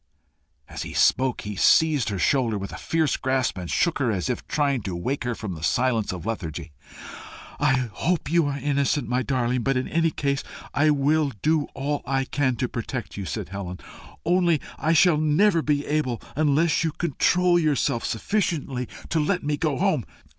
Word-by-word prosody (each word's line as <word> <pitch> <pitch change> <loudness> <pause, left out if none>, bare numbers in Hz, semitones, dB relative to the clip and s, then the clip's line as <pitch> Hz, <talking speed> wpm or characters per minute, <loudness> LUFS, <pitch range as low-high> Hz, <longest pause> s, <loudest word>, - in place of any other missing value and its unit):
As - - -7
he - - -6
spoke, 130 -1 +2
he 105 0 -6
seized 150 +5 +4
her 100 - -3
shoulder 115 +2 +1
with 100 0 -6
a - - -7
fierce 160 -3 0
grasp, 130 -6 0
and 90 -2 -6
shook 170 -4 +1
her 125 -4 +1
as 100 +4 -1
if 125 - -5
trying 140 -4 0
to 95 -3 -4
wake 125 +10 -3
her 120 -1 -1
from 105 -2 -5
the 80 - -8
silence 115 +4 +1
of 90 -1 -7
a - - -2
lethargy. 85 -7 -5 0.9
"I 135 -4 +2
hope 175 -3 -1
you 170 -3 +3
are 140 -1 -2
innocent, 140 0 0
my 125 +1 0
darling. 125 0 0
But 135 +2 +1
in 130 - -1
any 165 0 +2
case 140 -2 -1 0.3
I 155 +2 +3
will 145 0 +2
do 155 -1 +2
all 145 +1 -2
I 135 0 +1
can 130 -2 0
to 125 - -1
protect 120 0 -5
you," 100 - -5
said 80 - -4
Helen. 95 -2 -6 0.5
"Only 175 -2 +3 0.2
I 155 +3 +2
shall 165 +1 +5
never 165 +4 +3
be 145 -2 0
able 145 -6 -1 0.2
unless 150 +2 +2
you 160 - 0
control 175 +2 +2
yourself 145 -7 +1
sufficiently 140 - -1 0.2
to 165 - +1
let 180 +5 0
me 145 0 0
go 145 -2 -1
home." 185 - +1
140 Hz, 190 wpm, -24 LUFS, 120-155 Hz, 0.9 s, shall